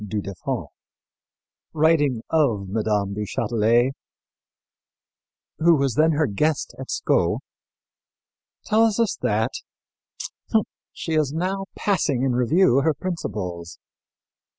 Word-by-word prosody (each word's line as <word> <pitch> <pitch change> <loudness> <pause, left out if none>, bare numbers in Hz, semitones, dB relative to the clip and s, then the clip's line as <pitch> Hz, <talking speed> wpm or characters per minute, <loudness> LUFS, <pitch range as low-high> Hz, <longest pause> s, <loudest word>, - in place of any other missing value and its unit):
du 105 +1 -3
Deffand, 100 -1 -4 1.1
writing 150 -6 +2
of 120 -12 +2
Mme. 105 -1 0
du 105 +1 -3
Châtelet, 115 +4 +1 1.7
who 165 +1 +5
was 135 -3 +1
then 160 +5 +3
her 155 +1 +2
guest 145 +7 -1
at 130 - -7
Sceaux, - - +1 1.3
tells 220 0 +3
us 230 -4 +2
that 110 +4 0 1.4
"she 165 - -5
is 155 -3 +2
now 190 +4 -2
passing 150 -10 0
in 135 - +2
review 125 +5 +3
her 155 +1 +1
principles. 100 - -5
135 Hz, 105 wpm, -23 LUFS, 105-160 Hz, 1.7 s, who